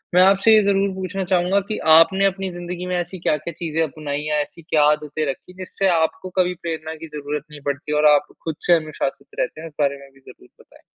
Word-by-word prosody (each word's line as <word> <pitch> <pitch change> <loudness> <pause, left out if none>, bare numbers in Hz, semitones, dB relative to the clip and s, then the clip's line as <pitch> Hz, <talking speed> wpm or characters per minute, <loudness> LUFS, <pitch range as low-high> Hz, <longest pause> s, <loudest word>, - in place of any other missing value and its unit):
मैं 180 - +7
आपसे 195 +3 +5
ये 215 - +6
ज़रूर 200 0 +2
पूछना 190 +1 -3
चाहूँगा 180 +2 +2
कि, 215 - -3
आपने 165 +5 +5
अपनी 195 0 -1
ज़िन्दगी 175 +1 -6
में 180 - -1
ऐसी 175 +1 -4
क्या-क्या 155 0 -1
चीज़ें 165 -1 -2
अपनाई 150 -1 -4
या 150 0 +1
ऐसी 155 +3 -8
क्या 155 -1 +2
आदतें 150 0 -2
रखीं, 135 +6 -7
जिससे 190 +1 -2
आपको 185 +4 -1
कभी 180 0 +2
प्रेरणा 160 -1 -4
की 165 +1 -9
ज़रूरत 150 0 -5
नहीं 145 -1 -11
पड़ती 145 +1 -3
और 150 - +3
आप 145 - 0 0.2
खुद 160 -2 -3
से 175 - +6
अनुशासित 155 -4 -2
रहते 155 - -2
हैं? 165 - -7
इस 155 - -14
बारे 140 0 +1
में 140 0 -14
भी 135 - -21
ज़रूर 125 - -16
बताएँ। - - -20
165 Hz, 225 wpm, -21 LUFS, 150-185 Hz, 0.2 s, मैं